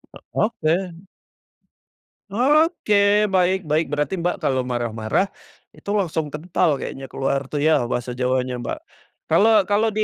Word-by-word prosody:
E - - -8 0.2
oke. 180 -5 0 1.4
Oke, 210 - +3
baik 190 -2 +1
baik. 155 +2 +1
Berarti 150 +4 -1
Mbak 175 +1 -1
kalau 130 -1 +1
marah-marah 120 - -1 0.5
itu - - -11
langsung 165 -6 -1
kental 160 +1 0
kayaknya 135 0 -6
keluar 135 0 -2
tuh 150 - -3
ya 150 -6 +3
bahasa 125 0 -2
Jawanya 125 0 -1
Mbak. - - -4 0.5
Kalau 215 +4 +5
kalau 210 +2 +2
di 215 0 -1
165 Hz, 130 wpm, -22 LUFS, 135-205 Hz, 1.4 s, Kalau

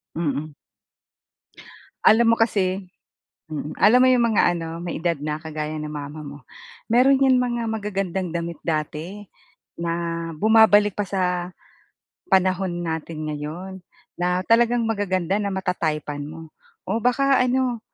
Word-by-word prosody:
Mm. 155 -2 -2 1.5
Alam 230 +1 +6
mo - - +4
kasi 195 -4 0 0.6
mm, 150 0 -5
alam 225 +4 +7
mo 255 - +6
'yong 250 -2 +4
mga - - +4
ano 165 -1 -4
may 170 -1 -5
edad 170 -2 0
na 150 +1 -4
kagaya 155 -1 -5
ng 150 - -5
mama 150 +1 -7
mo, 145 -1 -9 0.5
meron 255 +4 +4
yan 265 -2 +4
mga 240 -1 -1
magagandang 195 -4 -2
damit 170 -1 -5
dati, 160 +5 -4 0.6
na 170 0 -2
bumabalik 210 -1 +5
pa - - -2
sa, 180 -2 -1 0.8
panahon 185 0 +2 0.2
natin 160 -1 -4
ngayon. 160 +6 -6 0.4
Na 180 +1 0
talagang 235 +1 +3
magaganda 190 -4 -1
na 200 - -1
mata-type-an 155 -6 -2
mo. 160 +1 -9 0.4
O 220 +5 -1
baka 270 +2 +3
ano, 250 -2 0
185 Hz, 130 wpm, -23 LUFS, 160-220 Hz, 1.5 s, alam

